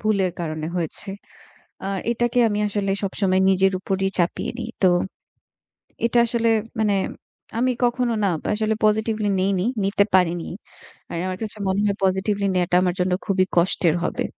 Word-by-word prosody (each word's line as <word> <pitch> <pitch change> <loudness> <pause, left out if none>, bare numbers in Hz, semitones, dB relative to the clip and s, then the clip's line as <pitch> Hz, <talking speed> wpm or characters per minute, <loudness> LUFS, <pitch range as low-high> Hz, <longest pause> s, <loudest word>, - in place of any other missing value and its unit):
ভুলের 200 -4 +1
কারণে 155 -2 -3
হয়েছে। 170 +4 -3 0.8
আ - - -2 0.2
এটাকে 240 +1 +1
আমি 205 0 -1
আসলে 200 -1 -1
সবসময় 190 -1 +1
নিজের 190 0 +3
উপরই 195 0 -1
চাপিয়ে 170 0 0
নিই। 230 -1 -4
তো - - +7 1.2
এটা 235 +1 +1
আসলে 230 0 +1 0.3
মানে 210 -2 +2 0.6
আমি 255 +2 +2
কখনো 240 0 +1
না - - +3 0.3
আসলে 215 +1 0
positively 215 0 +1
নেইনি, 190 -1 +1 0.2
নিতে 200 +1 +3
পারিনি। 175 -2 +3 0.6
আর - - -3
আমার 185 0 -3
কাছে 215 -1 -4
মনে 190 +1 +1
হয় 200 -1 0
positively 195 +2 +1
নেয়াটা 180 -1 +2
আমার 180 -1 +1
জন্য 180 0 +1
খুবই 190 -1 +3
কষ্টের 170 -1 +3
হবে। - - -1
195 Hz, 150 wpm, -23 LUFS, 185-215 Hz, 1.2 s, তো